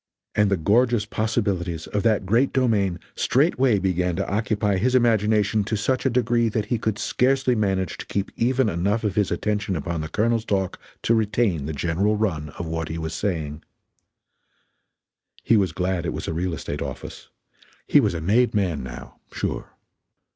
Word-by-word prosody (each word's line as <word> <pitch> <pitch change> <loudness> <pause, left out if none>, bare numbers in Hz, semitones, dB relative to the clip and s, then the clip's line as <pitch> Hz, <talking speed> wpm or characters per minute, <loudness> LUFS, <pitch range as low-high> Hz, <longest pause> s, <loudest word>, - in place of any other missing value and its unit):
And 105 -1 +3
the 100 - +2
gorgeous 115 +5 +2
possibilities 100 -7 -1
of 105 - -2
that 110 -3 +2
great 115 +8 +2
domain 105 -9 +1 0.2
straightway 130 -4 +2
began 90 -2 0
to 95 +2 -2
occupy 105 -1 0
his 125 +7 +1
imagination 110 -3 +3
to 110 - -1
such 130 +5 0
a - - +3
degree 120 -1 +2
that 110 -1 -1
he 115 +2 -1
could 110 -2 -1
scarcely 130 +2 +1
manage 95 -5 -1
to - - -7
keep 100 -1 -2
even 130 +1 +2
enough 100 +4 0
of 105 -3 0
his 105 -1 +1
attention 100 +1 -1
upon 85 +1 -3
the 80 - -5
Colonel's 115 +5 +1
talk 95 -4 -1 0.2
to 115 - +3
retain 105 - +1
the - - -2
general 90 +8 0
run 80 -9 -1
of 85 - -4
what 80 0 -3
he 80 - -4
was 80 -1 -4
saying. 80 -6 -3 1.8
He 115 - +4
was 95 -5 +2
glad 90 +1 -1
it - - -2
was - - -5
a - - -2
real 85 +1 -1
estate 70 0 -5
office - - -7 0.6
he - - +5
was - - +1
a 85 - -3
made 110 +8 +2
man 90 -7 0
now, - - -9
sure. - - -3
105 Hz, 175 wpm, -24 LUFS, 90-115 Hz, 1.8 s, he